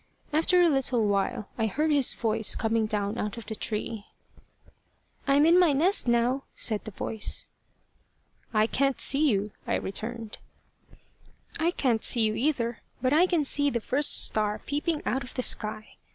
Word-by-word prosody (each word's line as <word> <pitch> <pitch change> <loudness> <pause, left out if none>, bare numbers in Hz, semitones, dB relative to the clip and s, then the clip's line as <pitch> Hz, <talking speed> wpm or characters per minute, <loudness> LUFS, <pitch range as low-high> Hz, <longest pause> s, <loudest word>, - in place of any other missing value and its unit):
After 325 +4 +3
a - - +5
little 265 -6 +1
while, 205 +3 -1
I 220 - +1
heard 305 +9 0
his 280 -4 +3
voice 220 -2 +2
coming 225 -1 0
down 210 +1 -2
out 210 +3 -3
of 230 - -8
the 220 - -5
tree. 215 0 -4 1.2
"I 275 - +4
am 290 +2 +5
in 340 +2 +5
my 345 -5 +4
nest 340 +3 +2
now," 240 +3 +1
said 215 -3 -3
the - - -5
voice. 215 +1 -4 1.1
"I 215 -1 +3
can't 275 +3 0
see 295 +2 +2
you," 205 -2 -1 0.2
I - - +1
returned. 220 +2 -5 1.2
"I 325 +1 +2
can't 250 -10 0
see 235 - +2
you 215 -1 +2
either, 235 -1 -1 0.2
but 255 +2 +1
I 345 +4 +5
can 335 -5 +1
see 285 +1 +1
the 235 - -2
first 275 +6 +3
star 210 -1 -1
peeping 295 +2 -2
out 265 +1 -1
of 255 - -11
the 255 - -2
sky. 215 -1 -3
240 Hz, 170 wpm, -27 LUFS, 220-285 Hz, 1.2 s, a